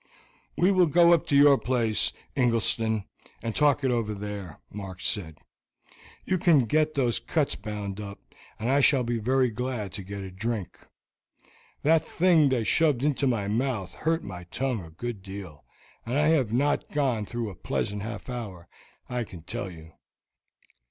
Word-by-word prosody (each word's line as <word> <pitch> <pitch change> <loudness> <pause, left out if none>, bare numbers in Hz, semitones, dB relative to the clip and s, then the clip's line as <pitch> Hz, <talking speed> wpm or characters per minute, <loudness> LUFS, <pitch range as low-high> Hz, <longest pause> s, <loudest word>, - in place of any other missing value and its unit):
"We 180 +3 +4
will 185 -3 +4
go 170 +2 +6
up 170 - +2
to 140 - +2
your 140 -1 +7
place, 115 -7 +1 0.2
Ingleston, 115 -3 +1 0.4
and 115 -2 -3
talk 145 -1 +3
it 130 - +2
over 115 -3 -1
there," 100 -5 -6 0.2
Mark 95 -3 -7
said. 80 -6 -2 0.9
"You 185 -1 0
can 155 -8 +5
get 155 +5 +1
those 125 -4 +1
cuts 155 -4 0
bound 105 -2 -5
up, 100 -1 -7 0.4
and 110 - -3
I 135 +2 +4
shall 135 -2 +4
be 120 -1 -1
very 130 +2 +2
glad 120 -4 -3
to 100 - -4
get 100 +1 -6
a 95 - -7
drink. 105 0 -4 1.0
That 160 +2 +4
thing 165 -5 +4
they 125 -3 +1
shoved 140 +3 +2
into 145 -1 +1
my 110 -6 0
mouth 110 -3 -1
hurt 165 +1 -1
my 90 -3 -8
tongue 125 +2 -2
a 80 - -11
good 105 +5 -6
deal, 95 -5 -9 0.4
and 120 +4 -2
I 150 +1 +4
have 135 -9 +2
not 140 +5 +1
gone 130 -8 0
through 120 -3 -3
a - - -11
pleasant 100 +3 -2
half 110 0 -6
hour, 105 -9 -6 0.4
I 125 -1 -2
can 90 -7 -11
tell 110 +2 -4
you." 80 -2 -12
120 Hz, 170 wpm, -27 LUFS, 100-140 Hz, 1.0 s, your